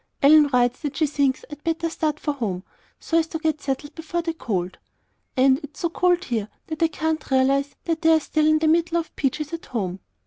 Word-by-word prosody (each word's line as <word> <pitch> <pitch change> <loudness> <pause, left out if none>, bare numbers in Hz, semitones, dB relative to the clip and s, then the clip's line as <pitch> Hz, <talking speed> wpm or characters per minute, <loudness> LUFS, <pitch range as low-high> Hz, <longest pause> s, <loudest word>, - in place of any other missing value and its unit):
Ellen 300 +1 +7
writes 245 -1 +2
that 290 -3 -4
she 315 - +3
thinks 280 -2 0
I'd 295 0 -9
better 330 0 -1
start 310 -2 -2
for 295 - -1
home 200 -9 -3 0.4
so 330 - +1
as 325 - 0
to 320 - -4
get 315 -1 -1
settled 285 +2 -3
before 335 +1 -3
the 330 0 -2
cold 185 - -3 0.6
And 265 +1 +5
it's 290 0 -10
so 340 - 0
cold 360 +1 +2
here 225 - -2 0.2
that 315 -1 -6
I 330 - +5
can't 320 0 -2
realize 275 +1 +2
that 330 -1 -1
they're 320 -1 +5
still 310 0 +1
in 310 0 +5
the 315 0 +1
middle 335 +1 +2
of 335 -1 -4
peaches 300 +3 -2
at 335 - -6
home. 195 -7 -3
305 Hz, 215 wpm, -23 LUFS, 265-325 Hz, 0.6 s, Ellen